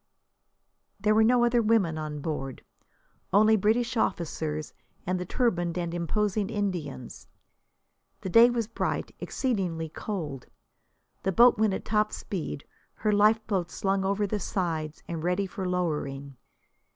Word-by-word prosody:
There 210 Hz, +2 st, +3 dB
were 220 Hz, +1 st, +5 dB
no 240 Hz, +2 st, +4 dB
other 240 Hz, 0 st, +3 dB
women 210 Hz, -7 st, +2 dB
on 155 Hz, -1 st, -5 dB
board: 135 Hz, -4 st, -4 dB, 0.7 s
only 215 Hz, +3 st, +5 dB
British 230 Hz, +4 st, +1 dB
officers 160 Hz, -7 st, -2 dB, 0.3 s
and 185 Hz, +1 st, -1 dB
the 180 Hz, -, -5 dB
turbaned 175 Hz, -9 st, 0 dB
and 170 Hz, -1 st, -2 dB
imposing 200 Hz, +4 st, 0 dB
Indians. 190 Hz, -, -4 dB, 0.9 s
The 190 Hz, -, -4 dB
day 230 Hz, +5 st, +8 dB
was 235 Hz, -2 st, -1 dB
bright, 230 Hz, -, -3 dB
exceedingly 180 Hz, -, -2 dB
cold. 155 Hz, -, -5 dB, 0.7 s
The 190 Hz, -, 0 dB
boat 235 Hz, +3 st, +6 dB
went 215 Hz, -3 st, +3 dB
at -, -, -6 dB
top 215 Hz, 0 st, +1 dB
speed, 165 Hz, -6 st, -5 dB, 0.3 s
her 215 Hz, -, 0 dB
lifeboats 210 Hz, -4 st, +2 dB
slung 195 Hz, 0 st, 0 dB
over 200 Hz, +2 st, +1 dB
the 205 Hz, +1 st, -2 dB
sides 160 Hz, -5 st, -3 dB
and 165 Hz, -2 st, -4 dB
ready 180 Hz, +3 st, +1 dB
for 190 Hz, -1 st, -4 dB
lowering. 145 Hz, -6 st, -2 dB
190 Hz, 135 wpm, -28 LUFS, 165-215 Hz, 0.9 s, day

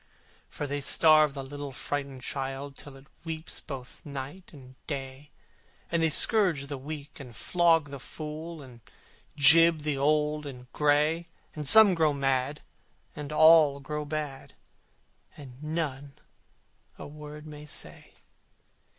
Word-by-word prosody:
For 145 Hz, -, -5 dB
they 145 Hz, 0 st, -3 dB
starve 155 Hz, 0 st, +4 dB
the 135 Hz, -, -5 dB
little 145 Hz, +1 st, -7 dB
frightened 140 Hz, 0 st, -5 dB
child 135 Hz, +1 st, -5 dB
Till 140 Hz, 0 st, -11 dB
it 135 Hz, -, -17 dB, 0.2 s
weeps 160 Hz, 0 st, -5 dB
both 130 Hz, -4 st, -9 dB
night 145 Hz, +5 st, -8 dB
and 130 Hz, -4 st, -14 dB
day: 135 Hz, 0 st, -6 dB, 0.6 s
And 170 Hz, -1 st, +1 dB
they 160 Hz, -, +3 dB
scourge 170 Hz, -3 st, +2 dB
the 140 Hz, 0 st, -6 dB
weak, 145 Hz, +1 st, -8 dB
and 125 Hz, -5 st, -11 dB
flog 165 Hz, -4 st, +2 dB
the 140 Hz, -, -7 dB
fool, 155 Hz, +3 st, -8 dB
And 125 Hz, -3 st, -15 dB, 0.6 s
gibe 165 Hz, +2 st, +6 dB
the 145 Hz, -2 st, -2 dB
old 150 Hz, +1 st, +1 dB
and 125 Hz, -3 st, -9 dB
gray, 150 Hz, +3 st, +1 dB, 0.3 s
And 150 Hz, -2 st, -4 dB
some 220 Hz, +3 st, +8 dB
grow 160 Hz, -3 st, +2 dB
mad, 135 Hz, +1 st, -1 dB, 0.5 s
and 150 Hz, -1 st, -7 dB
all 155 Hz, -2 st, +6 dB
grow 150 Hz, +2 st, -5 dB
bad, 145 Hz, -2 st, -6 dB, 0.8 s
And 135 Hz, -2 st, -12 dB
none 150 Hz, -3 st, -4 dB, 0.8 s
a -, -, -9 dB
word 150 Hz, +1 st, -10 dB
may 150 Hz, -1 st, -10 dB
say. -, -, -7 dB
145 Hz, 135 wpm, -28 LUFS, 140-155 Hz, 0.8 s, some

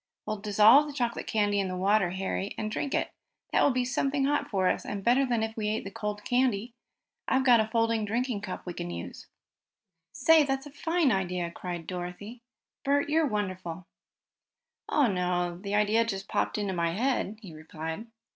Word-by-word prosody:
We'll 215 Hz, -, -2 dB
dissolve 215 Hz, +7 st, +6 dB
the 295 Hz, -, -7 dB
chocolate 240 Hz, -4 st, -2 dB
candy 205 Hz, -2 st, +1 dB
in 195 Hz, -, 0 dB
the 185 Hz, 0 st, -4 dB
water, 195 Hz, 0 st, +3 dB
Harry, 190 Hz, +2 st, -3 dB
and 215 Hz, 0 st, -3 dB
drink 280 Hz, +5 st, -2 dB
it. -, -, -1 dB, 0.4 s
That -, -, +4 dB
will -, -, +5 dB
be 250 Hz, -2 st, 0 dB
something 275 Hz, +2 st, 0 dB
hot 290 Hz, +1 st, 0 dB
for 190 Hz, -3 st, +1 dB
us, -, -, 0 dB
and 200 Hz, -1 st, -5 dB
better 260 Hz, +4 st, +3 dB
than 235 Hz, -3 st, +1 dB
if 220 Hz, 0 st, -3 dB
we 215 Hz, -2 st, -2 dB
ate 215 Hz, -, -1 dB
the 195 Hz, -, -7 dB
cold 210 Hz, 0 st, -5 dB
candy. 245 Hz, -3 st, +1 dB, 0.5 s
I've 265 Hz, 0 st, +2 dB
got 245 Hz, -3 st, +7 dB
a 220 Hz, -, +1 dB
folding 225 Hz, 0 st, +1 dB
drinking 230 Hz, +1 st, -1 dB
cup 190 Hz, -3 st, -6 dB
we 175 Hz, -, -5 dB
can 85 Hz, -, -5 dB
use." 85 Hz, 0 st, -7 dB, 0.8 s
"Say, 315 Hz, +3 st, +5 dB
that's 270 Hz, -1 st, -1 dB
a 290 Hz, -, -10 dB
fine 325 Hz, 0 st, +1 dB
idea!" 180 Hz, -3 st, -1 dB
cried 175 Hz, -1 st, -6 dB
Dorothy. 180 Hz, +7 st, -6 dB, 0.4 s
"Bert, 285 Hz, +1 st, +1 dB
you're 315 Hz, 0 st, +3 dB
wonderful." 185 Hz, -6 st, -4 dB, 1.0 s
"Oh, 295 Hz, -, +3 dB
no, 180 Hz, -3 st, -1 dB
the 200 Hz, +1 st, -3 dB
idea 210 Hz, +2 st, +3 dB
just 195 Hz, -4 st, -4 dB
popped -, -, -1 dB
into 200 Hz, -2 st, -1 dB
my 170 Hz, -1 st, 0 dB
head," 225 Hz, -1 st, -1 dB
he 180 Hz, -5 st, -9 dB
replied. 160 Hz, +6 st, -6 dB
210 Hz, 190 wpm, -28 LUFS, 185-250 Hz, 1.0 s, got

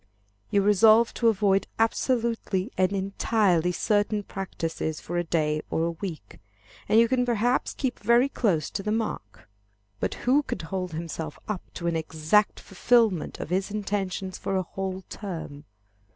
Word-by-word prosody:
You 200 Hz, -1 st, +2 dB
resolve 220 Hz, +3 st, +5 dB
to 235 Hz, -, +1 dB
avoid 200 Hz, -3 st, +2 dB
absolutely 225 Hz, -3 st, 0 dB
and 185 Hz, 0 st, +2 dB
entirely 195 Hz, -2 st, +1 dB
certain 205 Hz, +2 st, +1 dB
practices 165 Hz, -5 st, -4 dB
for 175 Hz, -, -6 dB
a -, -, 0 dB
day 155 Hz, -2 st, 0 dB
or 160 Hz, -, 0 dB
a 170 Hz, -, 0 dB
week, 170 Hz, -1 st, -7 dB, 0.5 s
and 220 Hz, -, +6 dB
you 230 Hz, -, +5 dB
can 250 Hz, 0 st, +1 dB
perhaps 240 Hz, 0 st, 0 dB
keep 260 Hz, -3 st, -2 dB
very 235 Hz, +5 st, +4 dB
close 185 Hz, -, 0 dB
to 195 Hz, -, -3 dB
the 210 Hz, -, -2 dB
mark. 215 Hz, -, -4 dB, 0.5 s
But -, -, -2 dB
who 265 Hz, +4 st, +4 dB
can 250 Hz, -4 st, -4 dB
hold 180 Hz, +1 st, -4 dB
himself 160 Hz, -1 st, -5 dB
up 210 Hz, -4 st, -3 dB
to 170 Hz, -, -5 dB
an 170 Hz, -1 st, +1 dB
exact 160 Hz, +6 st, +1 dB
fulfilment 210 Hz, -2 st, +1 dB
of -, -, -6 dB
his 190 Hz, +1 st, 0 dB
intentions 195 Hz, -2 st, -3 dB
for 195 Hz, -, -2 dB
a 190 Hz, -, +1 dB
whole 190 Hz, +1 st, -5 dB
term? 160 Hz, -7 st, -7 dB
195 Hz, 155 wpm, -26 LUFS, 170-220 Hz, 0.5 s, and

